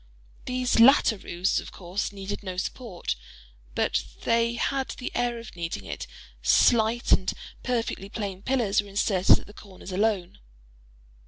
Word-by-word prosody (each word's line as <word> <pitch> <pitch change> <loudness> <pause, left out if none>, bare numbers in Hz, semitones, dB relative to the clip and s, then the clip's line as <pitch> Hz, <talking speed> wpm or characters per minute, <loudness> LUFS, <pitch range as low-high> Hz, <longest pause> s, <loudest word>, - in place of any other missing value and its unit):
These 250 -1 +1
latter 235 -1 +7
roofs, 185 -1 -1
of - - -9
course, 185 +3 -3
needed 200 0 -5
no 185 -3 -6
support; 190 - -3 0.6
but - - +2
as - - -12
they 230 0 +2
had 270 +2 0
the 250 - -5
air 240 0 0
of 230 -4 -10
needing 170 -1 -4
it, - - -6 0.3
slight 235 0 +4
and 185 - +4 0.3
perfectly 230 -5 -2
plain 200 -3 -4
pillars 220 -4 +2
were 205 - -12
inserted 195 -1 +4
at - - -11
the 205 - -14
corners 195 -2 -11
alone. 195 -2 0
210 Hz, 150 wpm, -26 LUFS, 190-235 Hz, 0.6 s, latter